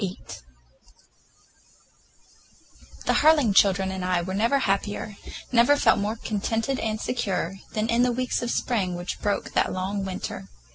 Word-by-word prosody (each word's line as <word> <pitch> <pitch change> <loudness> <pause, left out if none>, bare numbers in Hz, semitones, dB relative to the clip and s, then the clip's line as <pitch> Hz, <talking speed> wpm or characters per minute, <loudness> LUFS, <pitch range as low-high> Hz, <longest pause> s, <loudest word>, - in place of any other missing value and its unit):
VIII 190 -2 -3 2.9
THE - - +2
Harling 295 -9 +4
children 190 -1 +4
and 190 -1 -4
I 180 -1 0
were 185 +2 -4
never 230 +7 +2
happier, 205 -2 -1 0.4
never 245 +3 +5
felt 225 - +4
more 210 +2 -1
contented 225 +4 -2
and 215 -1 -2
secure, 195 -7 -2 0.2
than 215 0 -1
in 235 +1 +2
the 250 0 +3
weeks 250 0 -1
of 240 - -3
spring 195 -8 -1
which 175 +1 -5
broke 205 -1 -2
that - - +2
long 195 +2 -3
winter. 190 -1 -5
210 Hz, 145 wpm, -25 LUFS, 190-235 Hz, 2.9 s, never